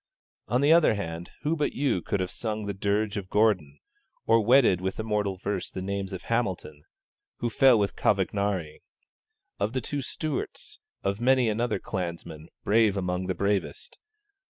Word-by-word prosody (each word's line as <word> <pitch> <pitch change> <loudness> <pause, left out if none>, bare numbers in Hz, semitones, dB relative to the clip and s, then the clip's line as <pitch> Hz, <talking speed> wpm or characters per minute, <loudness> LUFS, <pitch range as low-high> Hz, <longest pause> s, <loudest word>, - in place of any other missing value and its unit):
On 125 +3 +1
the 145 +3 +6
other 165 -9 +5
hand, 85 -3 -5
who 155 +3 +1
but 150 -2 -1
you 135 -10 0
could 100 - -2
have 90 - -3
sung 110 -2 -4
the 100 - -3
dirge 100 +2 -1
of 95 -2 -5
Gordon, 95 -10 +2 0.5
or 115 0 +4
wedded 120 -6 +5
with 95 +2 -3
immortal 105 -3 -1
verse 95 0 -3
the - - -6
names 100 0 -3
of 95 -1 -6
Hamilton 95 -10 -2 0.6
(who 120 - -2
fell 130 -2 +6
with 100 -1 0
Cavagnari), 95 -5 0 0.8
of 105 +3 -1
the 130 - 0
two 145 +4 -3
Stewarts, 150 +2 -5 0.2
of 100 +3 -1
many 130 -1 +4
another 115 +1 0
clansman, 85 -4 -5 0.2
brave 105 -1 +3
among 90 -1 -2
the 95 - -1
bravest! 100 - -2
100 Hz, 160 wpm, -27 LUFS, 95-115 Hz, 0.8 s, the